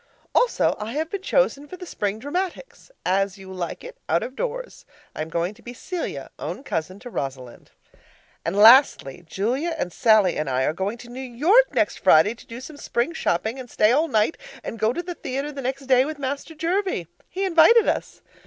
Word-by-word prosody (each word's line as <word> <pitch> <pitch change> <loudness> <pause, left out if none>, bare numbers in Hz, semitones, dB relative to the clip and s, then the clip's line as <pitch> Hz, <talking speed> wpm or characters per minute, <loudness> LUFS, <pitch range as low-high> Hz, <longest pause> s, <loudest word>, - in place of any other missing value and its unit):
Also - - +2
I 215 +2 -5
have 315 +3 -2
been 400 - -3
chosen 340 - +1
for 365 - -9
the 360 - -8
spring 205 - -3
dramatics 360 - -5 0.2
As 195 +1 +1
You 190 -1 -10
Like 175 -3 -5
It - - -11
out 165 +2 +2
of 260 - -7
doors. - - -5 0.3
I - - -4
am 155 - -4
going 170 +4 -1
to 225 - -20
be 245 +1 -9
Celia, 360 +7 -5
own - - -5
cousin 185 - -3
to 245 - -8
Rosalind. 130 - -6 0.7
And 165 - -2
lastly: 215 - +6
Julia 260 - -1
and 180 - -3
Sallie 215 -5 +4
and 150 -2 -2
I 130 0 +1
are 150 - +1
going 195 +6 -3
to 240 0 -12
New 250 - -8
York 310 - +3
next - - +1
Friday 160 +8 +5
to 235 - -17
do 230 +2 -8
some 295 +3 -10
spring 255 +2 -1
shopping 220 - -1
and 250 -2 -9
stay 215 0 +3
all 305 +6 +3
night 220 +2 +1 0.2
and 230 - -6
go 220 +2 +2
to 345 +8 -4
the 355 0 -5
theatre 275 -2 -4
the 280 -1 -6
next 270 +2 -3
day 255 -1 +5
with 305 +2 -5
'Master 280 +3 -4
Jervie.' 350 - -1 0.2
He 385 +1 -2
invited 380 +6 +6
us. - - -2
250 Hz, 205 wpm, -23 LUFS, 195-320 Hz, 0.7 s, lastly